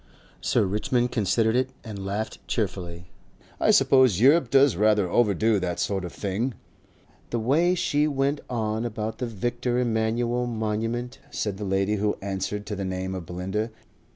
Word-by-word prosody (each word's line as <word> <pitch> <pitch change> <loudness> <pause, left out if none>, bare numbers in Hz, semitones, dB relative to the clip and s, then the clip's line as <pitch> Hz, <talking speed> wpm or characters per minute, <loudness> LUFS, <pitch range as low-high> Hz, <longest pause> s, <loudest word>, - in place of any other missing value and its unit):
Sir - - +2
Richmond 120 +5 0
considered 110 +1 +1
it 130 +1 +1
and 105 -4 -7
laughed 100 +3 -3
cheerfully. 90 -5 -3 0.5
"I - - +2
suppose 130 -8 +5
Europe 135 +2 +5
does 135 -3 +5
rather 105 0 +3
overdo 110 +1 +2
that 90 -2 -3
sort 95 +2 -1
of 90 - -5
thing." 105 +7 -2 0.7
"The 120 - -1
way 155 +11 +2
she 150 -4 +1
went 140 0 0
on 110 -2 -1
about 110 -1 -4
the 125 - -2
Victor 120 +3 -2
Emmanuele 120 +1 0
Monument!" 115 +3 -2
said 105 -3 -3
the 105 - -4
lady 95 +2 +1
who 105 +1 0
answered 100 +1 -3
to 105 - -4
the 100 - -4
name 95 0 -3
of 90 -4 -6
Belinda. 95 +5 -3
110 Hz, 155 wpm, -25 LUFS, 100-120 Hz, 0.7 s, suppose